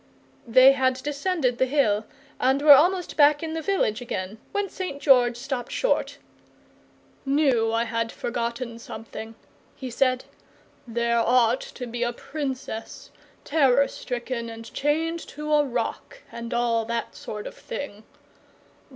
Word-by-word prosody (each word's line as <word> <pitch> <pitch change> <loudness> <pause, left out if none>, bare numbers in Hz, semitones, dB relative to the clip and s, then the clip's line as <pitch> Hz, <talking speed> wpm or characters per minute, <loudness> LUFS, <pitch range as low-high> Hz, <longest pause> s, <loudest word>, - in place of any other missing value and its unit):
They 255 +3 +8
had 260 -1 +2
descended 290 -3 -1
the 260 - +3
hill 225 -7 +1 0.3
and 265 +2 +3
were 295 -1 +10
almost 355 +5 +3
back 295 +1 +5
in 320 -1 -3
the 325 - -3
village 305 - 0
again, 210 -3 -5
when 410 -1 -1
St. 365 -7 -5
George 245 -4 +4
stopped 250 -1 -4
short, - - 0 1.1
"KNEW 270 -5 +2
I 230 +1 +1
had 230 0 -2
forgotten 235 0 -4
something," 225 0 -8 0.4
he 260 -3 -7
said. 255 +1 +1 0.6
"There 235 0 +1
ought 240 +1 +3
to 250 - -7
be 240 0 -6
a 240 0 0
Princess. 265 -5 -6 0.3
Terror 280 -3 +3
stricken 240 -1 -5
and 225 0 -10
chained 325 +4 0
to 300 +1 -4
a 295 -1 +5
rock, 290 - -4
and 235 0 -7
all 240 -2 +1
that 235 +1 -3
sort 210 -1 -7
of - - -6
thing. 215 -7 -7
255 Hz, 140 wpm, -25 LUFS, 235-290 Hz, 1.1 s, were